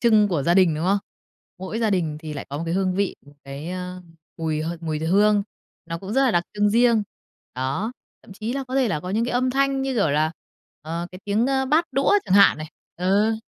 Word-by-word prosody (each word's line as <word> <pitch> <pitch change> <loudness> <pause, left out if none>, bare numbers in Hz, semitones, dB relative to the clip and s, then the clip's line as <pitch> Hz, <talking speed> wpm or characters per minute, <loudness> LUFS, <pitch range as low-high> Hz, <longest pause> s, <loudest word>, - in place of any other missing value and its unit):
trưng 215 -3 +4
của 160 -7 0
gia 170 +4 +2
đình, 180 -4 +5
đúng 155 +3 -3
không? 200 +2 +3 0.6
Mỗi 190 +4 -4
gia 225 -2 +1
đình 165 -6 0
thì 155 -2 -6
lại 140 - -6
có 140 - -4
một - - -3
cái 165 - -1
hương 185 -1 +1
vị, 200 0 -1
một 145 - -17
cái, 140 +5 -7
ơ, 180 0 -5 0.4
mùi 155 -1 -1
h 165 - -2
mùi 155 -2 -2
hương, 205 +5 +3 0.4
nó 165 0 -4
cũng 195 +3 -7
rất 270 - +3
là 255 - +3
đặc 175 -2 +1
trưng 205 0 +2
riêng. 235 -1 +4 0.5
Đó, 135 - -2 0.3
thậm 220 - -13
chí 220 +4 -4
là 275 0 -3
có 260 - -4
thể 265 -3 +3
là 155 -7 -1
có 180 +4 -6
những 225 +3 +1
cái 245 - -3
âm 255 +1 +1
thanh 275 0 +1
như, 270 -1 -1
kiểu, 200 -10 +2
là, 155 +2 +1 0.5
ờ, 165 +2 -4
cái 185 - -9
tiếng, 210 +4 +1
ơ, 265 -1 +1
bát 310 +5 +3
đũa 275 +8 +2
chẳng 190 - +1
hạn 200 -5 +6
này. 155 0 -7 0.3
Ừ. 200 +5 +2
195 Hz, 245 wpm, -23 LUFS, 165-230 Hz, 0.6 s, hạn